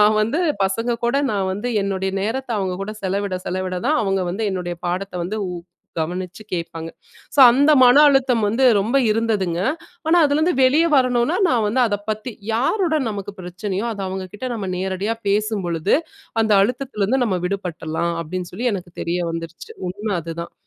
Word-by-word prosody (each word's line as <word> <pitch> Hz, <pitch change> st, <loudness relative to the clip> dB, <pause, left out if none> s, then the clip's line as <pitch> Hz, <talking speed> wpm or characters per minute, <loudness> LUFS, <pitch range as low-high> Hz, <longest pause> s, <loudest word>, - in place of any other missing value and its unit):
நான் 215 Hz, +1 st, +5 dB
வந்து 230 Hz, +11 st, 0 dB, 0.3 s
பசங்க 230 Hz, +4 st, -1 dB
கூட 250 Hz, +4 st, +1 dB, 0.2 s
நான் 195 Hz, -2 st, 0 dB
வந்து 210 Hz, +6 st, -3 dB, 0.2 s
என்னுடைய 190 Hz, -1 st, -1 dB
நேரத்த 255 Hz, +4 st, -3 dB
அவங்க 185 Hz, -2 st, -2 dB
கூட 215 Hz, -, -6 dB
செலவிட 195 Hz, 0 st, -1 dB
செலவிடதான் 185 Hz, +9 st, -1 dB
அவங்க 195 Hz, -1 st, +1 dB
வந்து 210 Hz, +5 st, -3 dB
என்னுடைய 175 Hz, -2 st, -3 dB
பாடத்த 180 Hz, +1 st, -3 dB
வந்து 215 Hz, +5 st, -3 dB
உ -, -, -4 dB, 0.5 s
கவனிச்சு 180 Hz, +5 st, -4 dB
கேப்பாங்க. 165 Hz, -1 st, -4 dB, 0.4 s
ஸோ 285 Hz, -, +4 dB
அந்த 280 Hz, +5 st, +4 dB
மன 255 Hz, +4 st, +7 dB
அழுத்தம் 260 Hz, -5 st, +3 dB
வந்து 235 Hz, +6 st, +1 dB
ரொம்ப 225 Hz, +7 st, +1 dB
இருந்ததுங்க. 210 Hz, -6 st, 0 dB, 0.5 s
ஆனா 345 Hz, +2 st, +5 dB
அதுலருந்து 310 Hz, +5 st, +2 dB
வெளிய 290 Hz, +6 st, +5 dB
வரணும்னா 255 Hz, +5 st, +2 dB
நான் 235 Hz, -4 st, +2 dB
வந்து 245 Hz, +5 st, +1 dB
அதப்பத்தி 215 Hz, +3 st, -3 dB, 0.2 s
யாருடன் 310 Hz, -, +1 dB
நமக்கு 200 Hz, -1 st, -5 dB
பிரச்சனயோ 190 Hz, +4 st, -4 dB
அது 200 Hz, -2 st, -6 dB
அவங்ககிட்ட 190 Hz, +6 st, -5 dB
நம்ம 200 Hz, -4 st, -4 dB
நேரடியா 190 Hz, +4 st, -2 dB
பேசும் 210 Hz, -1 st, 0 dB
பொழுது, 170 Hz, -, +1 dB, 0.5 s
அந்த 215 Hz, -2 st, +3 dB
அழுத்தத்துலருந்து 250 Hz, 0 st, 0 dB
நம்ம 190 Hz, -5 st, 0 dB
விடுபட்றலாம் 170 Hz, -3 st, -3 dB
அப்டின்னு 180 Hz, +2 st, -5 dB
சொல்லி, 240 Hz, +6 st, -1 dB
எனக்கு 175 Hz, -2 st, -7 dB
தெரிய 170 Hz, +1 st, -1 dB
வந்துர்ச்சு, 165 Hz, +1 st, -7 dB, 0.2 s
உண்ம 205 Hz, +4 st, -7 dB
அதுதான். 165 Hz, +1 st, -6 dB
205 Hz, 155 wpm, -21 LUFS, 185-240 Hz, 0.5 s, மன